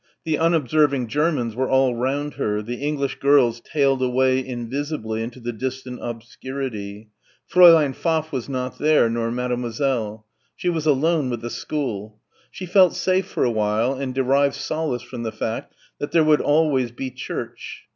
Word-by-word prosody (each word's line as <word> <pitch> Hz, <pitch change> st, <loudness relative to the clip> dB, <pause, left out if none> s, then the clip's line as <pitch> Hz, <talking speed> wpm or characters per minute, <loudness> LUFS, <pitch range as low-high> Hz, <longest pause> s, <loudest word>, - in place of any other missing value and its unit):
The 160 Hz, -2 st, -1 dB
unobserving 150 Hz, -5 st, +2 dB
Germans 145 Hz, -4 st, 0 dB
were 130 Hz, +1 st, -1 dB
all 130 Hz, -1 st, +3 dB
round 140 Hz, +5 st, -2 dB
her, 105 Hz, -6 st, -2 dB
the 120 Hz, +3 st, -5 dB
English 140 Hz, 0 st, -2 dB
girls 135 Hz, -5 st, +4 dB
tailed 135 Hz, -2 st, +1 dB
away 130 Hz, +1 st, +2 dB
invisibly 125 Hz, -2 st, -4 dB
into 115 Hz, +3 st, -6 dB
the 120 Hz, 0 st, -4 dB
distant 130 Hz, +1 st, -5 dB
obscurity. 115 Hz, -3 st, -6 dB, 0.4 s
Fräulein 165 Hz, -5 st, +7 dB
Pfaff 160 Hz, +1 st, -1 dB
was 130 Hz, -3 st, -4 dB
not 130 Hz, -1 st, -4 dB
there, 150 Hz, -6 st, +4 dB
nor 115 Hz, 0 st, -1 dB
Mademoiselle. 120 Hz, -2 st, -2 dB, 0.3 s
She 180 Hz, -, -1 dB
was 160 Hz, -3 st, -1 dB
alone 150 Hz, 0 st, +2 dB
with 120 Hz, -2 st, -3 dB
the 120 Hz, 0 st, -5 dB
school. 110 Hz, -8 st, -4 dB, 0.3 s
She 185 Hz, -, -7 dB
felt 185 Hz, -1 st, +5 dB
safe 185 Hz, +1 st, +1 dB
for -, -, -1 dB
a 120 Hz, -, +2 dB
while 110 Hz, +3 st, +1 dB
and 135 Hz, -1 st, -4 dB
derived 135 Hz, +1 st, +2 dB
solace 155 Hz, -6 st, -3 dB
from 120 Hz, 0 st, -8 dB
the 115 Hz, -, -2 dB
reflection 110 Hz, +1 st, -4 dB, 0.3 s
that 145 Hz, -, -4 dB
there 165 Hz, -, +5 dB
would 155 Hz, -1 st, +4 dB
always 145 Hz, -5 st, +2 dB
be 130 Hz, +2 st, -5 dB
church. -, -, -7 dB
130 Hz, 160 wpm, -22 LUFS, 120-150 Hz, 0.4 s, Fräulein